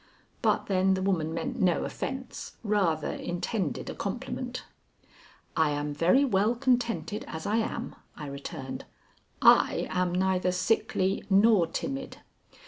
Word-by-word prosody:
But - - +2
then 190 -1 +2
the 190 - -2
woman 170 -5 0
meant 165 0 -3
no 180 -3 +3
offence, 265 -1 -6
rather 190 -8 +1
intended 175 0 -3
a - - -4
compliment. - - -4 0.9
"I 160 -1 +3
am 145 0 -2
very 180 - +4
well 215 -1 +2
contented 240 -4 0
as 160 0 -6
I 210 +2 +1
am," 230 +1 -2 0.2
I 150 - -6
returned. 140 -1 -6 0.6
"I - - +5
am 180 -1 +1
neither 185 0 +2
sickly 190 0 +1
nor 200 -2 +5
timid." 270 +9 -4
190 Hz, 130 wpm, -28 LUFS, 165-225 Hz, 0.9 s, I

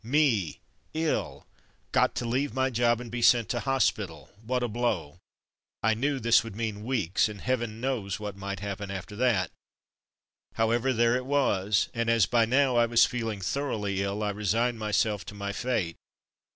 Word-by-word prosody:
Me, 120 - +1 0.4
iU! 160 0 -1 0.5
Got - - +2
to - - -2
leave 130 +5 -1
my 130 0 +1
job 120 0 +2
and 120 -2 -8
be 120 0 -3
sent 120 -1 +5
to 120 - 0
hospital 135 -2 -1
— 110 +1 -21
^what 125 0 0
a - - +1
blow! 105 -9 -2 0.6
I 110 +1 +4
knew 135 +5 -1
this 115 -2 +4
would 115 -3 -8
mean 110 -2 -3
weeks, 110 -6 +1
and 105 -1 -8
heaven 120 -3 -2
knows 115 -7 -2
what 105 -2 -5
might 100 -1 -5
happen 100 0 -5
after 100 +2 -6
that. 110 -8 +2 1.0
However, 115 +3 +2
there 120 0 +3
it 125 - -5
was, 100 - +2
and 115 -1 -1
as 115 -3 +4
by 120 -2 +3
now 130 +1 +3
I 120 0 +4
was 120 0 +5
feeling 115 -5 -3
thoroughly 105 -4 -2
ill 100 +2 -2
I 105 - 0
resigned 110 +4 0
my 110 -1 -3
self 105 -1 +1
to 100 - -9
my 100 0 -4
fate. 110 -9 -2
115 Hz, 180 wpm, -28 LUFS, 100-125 Hz, 1.0 s, sent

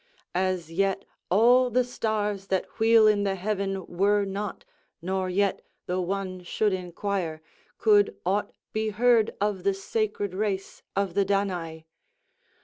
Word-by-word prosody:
As 185 -3 -1
yet 195 +2 0 0.2
all 245 +6 +5
the 250 +2 +2
stars 210 -5 -2
that 190 -1 -2
wheel 225 0 +6
in 210 -1 +4
the 195 -1 0
heaven 195 -1 -2
were 200 +3 +2
not, 195 0 -5 0.3
nor 185 +2 -2
yet, 195 +2 +1 0.2
though 180 +1 -1
one 185 0 -3
should 205 +3 0
inquire, 180 -2 -3 0.4
could 205 -2 +4
aught 200 +3 0 0.2
be 220 0 0
heard 230 +1 +3
of 205 -3 -1
the 200 -1 +2
sacred 205 -1 -2
race 195 -1 -3
of 195 -2 0
the 200 - +3
Danai. 180 -5 -2
195 Hz, 140 wpm, -26 LUFS, 185-210 Hz, 0.4 s, wheel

